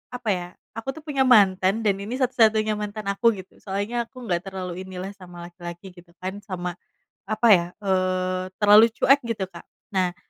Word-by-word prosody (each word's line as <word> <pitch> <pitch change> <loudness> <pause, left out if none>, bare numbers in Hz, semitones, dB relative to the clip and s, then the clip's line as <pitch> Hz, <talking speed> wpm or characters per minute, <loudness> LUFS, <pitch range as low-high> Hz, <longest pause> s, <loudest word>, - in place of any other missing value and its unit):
apa 245 -3 -4
ya, 175 -1 -5 0.3
aku 225 +4 -5
tuh 315 - -11
punya 275 -2 +2
mantan 195 -4 +4
dan 200 -2 +3
ini 225 +4 -5
satu-satunya 220 -4 +3
mantan 210 0 -5
aku 215 +4 +3
gitu, 185 - -13
soalnya 205 +4 -3
aku 235 - -23
nggak 175 -2 0
terlalu 185 -1 -5
inilah 190 0 -6
sama 175 -2 -10
laki-laki, 175 +1 -10
gitu 175 0 -17
kan, 190 +2 -6
sama, 180 -3 -5 0.5
apa 220 +2 +1
ya, 175 -4 +6 0.2
eee, 185 -1 0
terlalu 210 +2 +8
cuek 275 +1 +5
gitu 220 -4 -2
Kak. 170 - -12 0.3
Nah, 185 -2 0
195 Hz, 175 wpm, -24 LUFS, 185-215 Hz, 0.5 s, terlalu